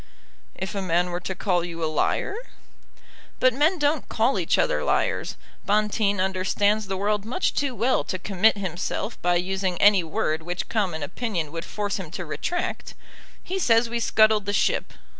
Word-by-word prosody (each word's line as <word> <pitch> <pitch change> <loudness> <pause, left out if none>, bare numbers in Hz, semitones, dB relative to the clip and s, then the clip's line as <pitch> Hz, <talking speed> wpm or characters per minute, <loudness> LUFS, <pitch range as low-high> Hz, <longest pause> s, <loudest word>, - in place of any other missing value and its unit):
"If 190 - -5
a 200 - -2
man 180 0 +1
were 175 - -2
to 185 +2 -5
call 180 -2 0
you 170 -1 -5
a - - +2
liar?" 155 - 0 1.0
"But 255 -1 +4
men 305 +8 +2
don't 295 -1 0
call 230 +4 +1
each - - +1
other - - +1
liars. - - 0 0.3
Bonteen 210 -1 +1
understands 195 +3 +1
the 190 -1 -2
world 205 +1 0
much 250 - -1
too 275 -3 -1
well 240 +4 +1
to 185 - -3
commit 195 +3 +2
himself 190 +4 -4
by 175 0 +2
using 185 0 -1
any 200 -3 +6
word 160 0 -1
which 175 +2 -4
common 185 -9 -1
opinion 170 -3 -3
would 165 +1 -5
force 205 -1 -3
him 180 -5 -7
to 180 - -5
retract. 350 - -3 0.5
He 380 +2 -3
says 230 -7 +3
we 235 - -1
scuttled 215 -2 +3
the 205 - 0
ship. - - +1
200 Hz, 175 wpm, -25 LUFS, 180-225 Hz, 1.0 s, any